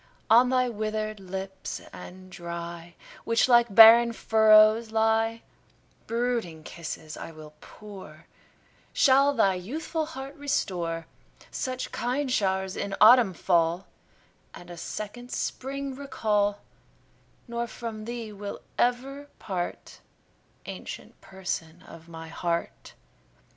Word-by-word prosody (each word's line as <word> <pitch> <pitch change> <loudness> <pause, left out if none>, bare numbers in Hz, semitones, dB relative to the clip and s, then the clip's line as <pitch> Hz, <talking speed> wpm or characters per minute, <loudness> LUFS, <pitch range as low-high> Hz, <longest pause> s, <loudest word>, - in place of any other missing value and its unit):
On 245 +3 +7
thy 255 -1 +2
withered 215 -1 -3
lips 190 0 -6
and 185 +1 -11
dry, 170 -1 -7 0.3
Which 230 +1 +2
like 240 -4 +4
barren 230 +1 +9
furrows 220 0 +5
lie, 225 +1 +1 0.6
Brooding 230 -9 -2
kisses 155 -1 -7
I - - -8
will 155 -1 -13
pour, 190 -7 -12 0.7
Shall 275 +1 +5
thy 195 -4 +3
youthful 305 - -4
heart 275 -3 -8
restore, 175 - -2 0.5
Such 255 -1 -4
kind 260 +3 -2
show'rs 190 -4 0
in 200 -1 -3
autumn 220 -3 +7
fall, 170 +1 +1 0.7
And 175 0 -12
a - - -8
second 215 +8 -7
spring 275 +1 -4
recall; 210 -7 -1 0.9
Nor 235 0 -3
from 225 -3 -7
thee 230 -2 -6
will 200 0 -7 0.2
ever 270 +4 0
part, 180 -3 -5 0.7
Ancient - - -9
Person 180 -2 -6
of 165 0 -14
my 165 -1 -9
heart. 170 +1 -4
215 Hz, 110 wpm, -27 LUFS, 180-240 Hz, 0.9 s, barren